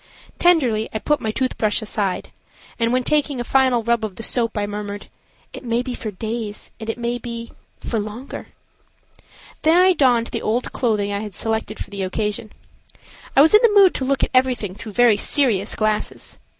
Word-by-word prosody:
Tenderly 255 -11 +3
I - - -2
put 295 +6 0
my 220 - -2
tooth 255 +4 -2
brush 215 -1 +2
aside, 210 -4 -2 0.5
and, 230 0 +1
when 255 0 +1
taking 290 -1 +1
a - - -1
final 255 -2 +2
rub 235 0 +1
of 210 -4 -4
the 225 - -8
soap, 230 -1 0
I 205 - 0
murmured, 205 0 -6 0.4
"It - - -9
may 235 0 0
be 250 -1 -4
for 225 - -5
days, 215 +1 -5
and 220 -1 -6
it 225 - -2
may 240 0 -2
be–for 235 -1 -6
longer." 215 +6 -7 1.1
Then 320 +2 +4
I 370 +1 +6
donned 245 -7 +2
the - - -3
old 235 +3 -1
clothing 210 -4 0
I 200 - -1
had 210 -3 -7
selected 220 -1 -2
for - - -7
the 200 -1 -5
occasion. 210 +3 -2 0.8
I 275 - +7
was 315 +6 +5
in 425 - +8
the 425 -4 +5
mood 385 -2 +6
to - - -3
look 275 +1 0
at - - 0
everything 255 -7 +1
through 215 +2 -9
very 235 -1 +5
serious 220 -5 +2
glasses. 215 -1 -2
230 Hz, 190 wpm, -21 LUFS, 215-255 Hz, 1.1 s, in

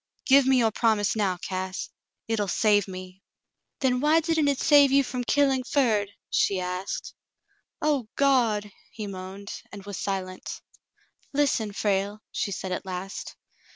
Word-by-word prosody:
Give 275 0 +6
me 265 -1 +5
your 225 -3 +3
promise 215 -2 +2
now, 195 -4 0
Cass. 185 +1 -4 0.4
Hit'll 220 -3 0
save 205 +1 +3
me." 185 0 -9 0.6
"Then 250 -2 +2
why 305 +4 +4
didn't 320 -2 +1
it 280 -2 +1
save 285 -2 +6
you 275 0 +5
from 250 -1 -3
killing 270 -1 +2
Ferd.^" 225 -8 +1 0.2
she 195 -2 +2
asked. 180 +1 -4 0.7
"O 285 -7 +1
Gawd 230 -7 +2
!" - - -32
he 215 - -5
moaned, 195 +1 -7
and 200 -1 -10
was 205 -3 -6
silent. 185 -2 -4 0.7
"Listen, 275 -7 +1
Frale," 205 +1 -1
she 200 - -2
said 190 0 -4
at 180 - -2
last. 190 0 -6
210 Hz, 150 wpm, -26 LUFS, 195-265 Hz, 0.7 s, Give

